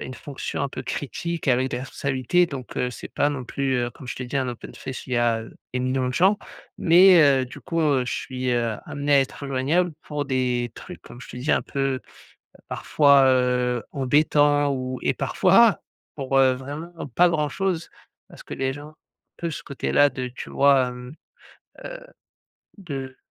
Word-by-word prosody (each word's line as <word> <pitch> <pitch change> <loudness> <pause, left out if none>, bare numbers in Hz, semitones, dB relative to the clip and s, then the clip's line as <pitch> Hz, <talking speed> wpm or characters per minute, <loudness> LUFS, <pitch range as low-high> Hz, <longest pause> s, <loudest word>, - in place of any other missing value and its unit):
une 130 - -6
fonction 140 +3 -5
un 140 - 0
peu 130 - -7
critique 165 +7 -4
avec 130 0 +2
des 120 - -2
responsabilités 135 +6 0
donc 135 -6 -8
heu, 125 - 0
c'est - - -9
pas 145 - +1
non 135 -3 -4
plus, 135 +1 -1
heu, 120 -1 -1
comme 130 - -13
je - - -5
t'ai 130 - -5
dit, 130 - -3
un 130 -2 0
open 120 -1 -8
space 130 - -7
où - - -11
il - - -3
y - - +2
a, 120 -1 +2
heu, 110 - -11 0.2
énormément 130 0 0
de - - -6
gens 195 +6 +4 0.4
mais 180 +1 +7
heu, 135 -3 +4
du 125 - -11
coup, 165 -1 -2
heu, 140 -5 +2
je 125 - -3
suis, 130 -1 -3
heu, 120 -2 0
amené 145 0 -2
à 140 - +6
être 135 +1 -4
joignable 145 +7 +1
pour 150 -1 -4
des 125 -2 0
trucs 180 - -10
comme 120 - -13
je - - -11
te - - -9
dis 130 +5 0
un - - +2
peu 135 -1 -2 0.7
parfois, 140 -2 +4
heu, 125 -2 +2
embêtants, 145 +1 +3
ou 130 -1 -3
et - - +2
parfois - - +4 0.3
pour, 135 0 0
heu, 130 -1 +5
vraiment 145 +6 -7 0.2
pas 180 0 +6
grand 155 -3 0
chose 185 -1 -2 0.4
parce - - -13
que - - -7
les 135 0 -1
gens, 145 +2 -10 0.4
peu 170 - -3
ce 150 - -6
côté 140 - -4
là 145 - +6
de, 130 -2 -5
tu 125 - -9
vois, 140 -2 +4
hem, 125 +1 -9 0.7
heu, - - -6 0.8
de 135 -8 -6
135 Hz, 200 wpm, -24 LUFS, 125-145 Hz, 0.8 s, mais